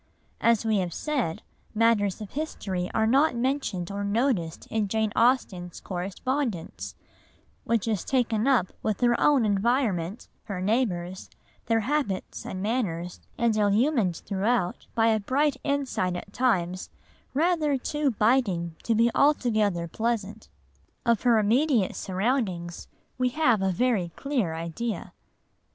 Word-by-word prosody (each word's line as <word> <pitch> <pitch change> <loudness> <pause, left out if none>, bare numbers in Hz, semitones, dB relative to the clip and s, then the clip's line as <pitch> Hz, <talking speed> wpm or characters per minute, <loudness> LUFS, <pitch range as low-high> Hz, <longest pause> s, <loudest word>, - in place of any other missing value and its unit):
As 230 -1 +3
we 220 -1 +2
have 180 -3 -2
said, 265 - -2 0.3
matters 215 -3 +2
of 210 - -7
history 195 - -3
are 220 - +1
not 270 +4 +3
mentioned 235 -8 -1
or 200 0 -3
noticed 200 - 0
in 220 -2 0
Jane 220 +1 0
Austen's 205 -8 +1
correspondence, 195 - -3 0.7
which 230 -2 0
is 215 -5 0
taken 240 -3 +1
up 245 -10 +3
with 215 0 -2
her 240 -1 +4
own 280 -6 +4
environment, 205 -3 0 0.2
her 200 -4 -4
neighbours, 185 -4 -1 0.4
their 225 0 +2
habits 260 -6 -2
and 185 0 -4
manners, 180 -7 -2 0.2
and 235 -2 +2
illumined 210 - +2
throughout 200 -1 -1
by 225 -1 +3
a 220 -1 +3
bright 270 +6 +1
insight 275 -11 -1
at 200 +3 -7
times 185 -8 0 0.5
rather 310 -2 +2
too 295 +3 -1
biting 210 -8 +1
to 230 - 0
be 230 +2 +4
altogether 215 - +2
pleasant. 220 +1 -3 0.6
Of 235 -3 +3
her 240 -2 +4
immediate 230 0 +2
surroundings 190 -4 -2 0.3
we 255 0 +2
have 245 -6 +2
a 190 0 +2
very 205 -3 +1
clear 245 - -1
idea. 170 +8 -4
220 Hz, 130 wpm, -26 LUFS, 190-255 Hz, 0.7 s, her